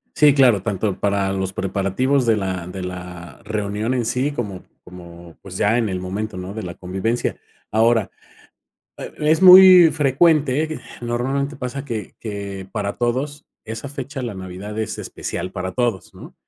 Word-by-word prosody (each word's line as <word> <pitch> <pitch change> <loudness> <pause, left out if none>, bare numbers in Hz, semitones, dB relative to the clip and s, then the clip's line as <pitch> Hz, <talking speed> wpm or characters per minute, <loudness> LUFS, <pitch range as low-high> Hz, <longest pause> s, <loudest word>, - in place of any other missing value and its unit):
Sí, 150 -2 +5
claro, 120 -9 +4
tanto 100 -2 -2
para 100 -1 0
los 95 -1 -2
preparativos, 100 +8 0
de 115 -2 +3
la 95 -3 -3
de 90 +1 -7
la 90 -1 -8
reunión 105 +3 -2
en 120 -2 0
sí, 130 +5 -1
como 100 -8 -5 0.2
como, 85 -2 -13
pues, 90 -2 -8
ya 110 +5 +2
en 115 - 0
el 95 -2 -3
momento, 100 +3 -4
¿no? 90 +1 -6
de 110 +1 -6
la 85 -1 -6
convivencia. 95 +6 -2 0.3
Ahora, 115 -1 +2 0.9
eh, - - -8
es 155 +4 +2
muy 185 -2 +10
frecuente, 150 0 +2
eh, - - -8 0.2
normalmente 135 +5 -2
pasa 130 +2 -5
que 115 -6 -5
que 100 -3 -6
para 100 -2 -2
todos 135 +5 -2 0.2
esa 110 +5 -6
fecha, 135 -1 -6
la 115 -4 -4
Navidad 95 +3 -7
es 110 - -3
especial 90 +2 -5
para 95 0 -4
todos, 120 -6 -2
¿no? - - -12
110 Hz, 165 wpm, -21 LUFS, 95-130 Hz, 0.9 s, muy